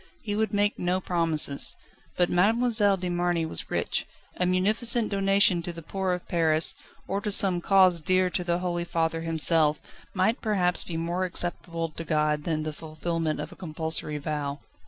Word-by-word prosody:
He 205 -2 -3
would 220 +1 0
make 205 0 0
no 180 +1 0
promises. 165 -6 +1 0.4
But 175 - +3
Mademoiselle 210 +1 +2
de 185 -1 -4
Marny 175 -1 0
was 160 - 0
rich: - - -2 0.3
a 180 - 0
munificent 215 +5 +2
donation 195 -2 +3
to 175 - -5
the 165 -1 -10
poor 190 +2 -2
of 180 - -6
Paris, 160 -2 +2 0.3
or 195 +1 -2
to 210 - -3
some 190 -3 +3
cause 185 -3 +4
dear 185 +3 +2
to 180 - -2
the 175 0 0
Holy 175 -1 -2
Father 165 -1 -1
himself, 160 -2 +3 0.4
might 220 +6 +1
perhaps 185 -5 +2
be 165 - -5
more 170 +3 -2
acceptable 170 -2 -1
to 165 +1 -8
God 150 -1 0
than 155 -2 -1
the 155 0 -4
fulfilment 160 0 -3
of - - -6
a - - -12
compulsory 160 -3 -2
vow. 145 -1 -3
175 Hz, 175 wpm, -26 LUFS, 160-190 Hz, 0.4 s, cause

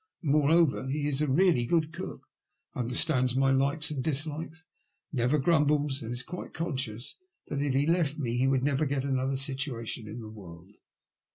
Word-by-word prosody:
Moreover, 150 -1 +3
he 145 +1 -1
is 145 0 +1
a 150 - +1
really 140 -5 +3
good 160 0 +1
cook, 185 +2 -7 0.5
understands 125 +1 +2
my 135 0 +3
likes 140 +3 +2
and 135 -4 -3
dislikes, 155 +2 -2 0.5
never 125 +3 +2
grumbles, 150 -2 +2
and 115 0 -6
is 120 +1 -2
quite 180 - -8
conscious 135 -8 -3 0.3
that 140 - -2
if 140 -2 0
he 140 +2 +3
left 165 -3 +1
me 120 -6 -2
he 130 +2 +2
would 135 -1 +1
never 145 +1 +1
get 135 -1 -1
another 135 0 0
situation 130 -5 -1
in 110 +3 -7
the 110 - -8
world. 90 -2 -12
140 Hz, 170 wpm, -28 LUFS, 125-150 Hz, 0.5 s, Moreover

